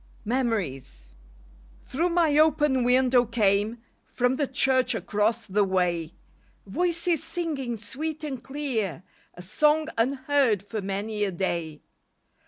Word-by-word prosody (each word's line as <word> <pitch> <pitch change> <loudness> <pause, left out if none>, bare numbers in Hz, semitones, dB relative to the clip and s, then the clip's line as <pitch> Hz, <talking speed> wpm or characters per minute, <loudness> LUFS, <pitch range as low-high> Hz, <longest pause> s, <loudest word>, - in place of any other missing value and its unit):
MEMORIES 200 - -2 0.7
Thru 330 +7 -1
my 335 -4 +2
open 295 -4 +3
window 250 0 +4
came 220 0 0 0.2
From 250 +1 0
the 285 -2 0
church 260 -1 +2
across 220 +1 0
the 205 +1 +1
way, 175 -3 -1 0.5
Voices 340 - 0
singing 315 -8 -3
sweet 300 +9 -5
and 275 -5 -5
clear 240 - -3 0.3
A 180 - -10
song 300 - +2
unheard 260 -4 +1
for 215 +1 -5
many 205 +2 -3
a 200 - 0
day. 170 -4 -3
240 Hz, 115 wpm, -26 LUFS, 200-285 Hz, 0.7 s, window